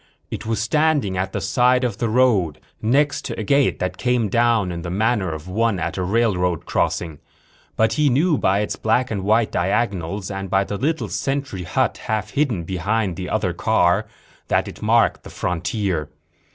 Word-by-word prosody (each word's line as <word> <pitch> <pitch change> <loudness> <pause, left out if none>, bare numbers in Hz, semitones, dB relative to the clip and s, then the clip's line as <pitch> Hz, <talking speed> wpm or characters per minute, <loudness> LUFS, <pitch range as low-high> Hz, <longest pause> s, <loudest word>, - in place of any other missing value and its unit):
It - - -5
was 115 -1 0
standing 145 -4 +1
at 95 +1 -2
the - - -2
side 125 0 +2
of 115 -5 -2
the 115 - 0
road, 110 - +2 0.2
next 145 +6 +2
to - - -5
a - - -2
gate 140 +5 +2
that 90 - -3
came 125 -4 +1
down 115 -3 +2
in 85 -1 -5
the 85 - -5
manner 100 -1 0
of 80 +2 -7
one 110 +2 +1
at - - -3
a 95 - -2
railroad 90 -4 +1
crossing. 80 -4 -1 0.6
But 110 0 +2
he 145 +4 +3
knew 155 +6 +3
by 95 +2 +2
its 105 - -2
black 125 +3 +1
and 100 -3 -2
white 110 +2 +2
diagonals 95 0 -1
and 95 -1 -5
by 95 +1 +3
the 100 +1 -4
little 155 +8 -1
sentry 135 -10 -3
hut - - 0
half 110 -1 -2
hidden 130 - 0
behind 95 +2 -1
the 90 +1 -5
other - - 0
car 95 +5 +2 0.4
that - - +1
it - - -9
marked - - +3
the - - -11
frontier. 90 -2 -2
105 Hz, 185 wpm, -21 LUFS, 95-120 Hz, 0.6 s, he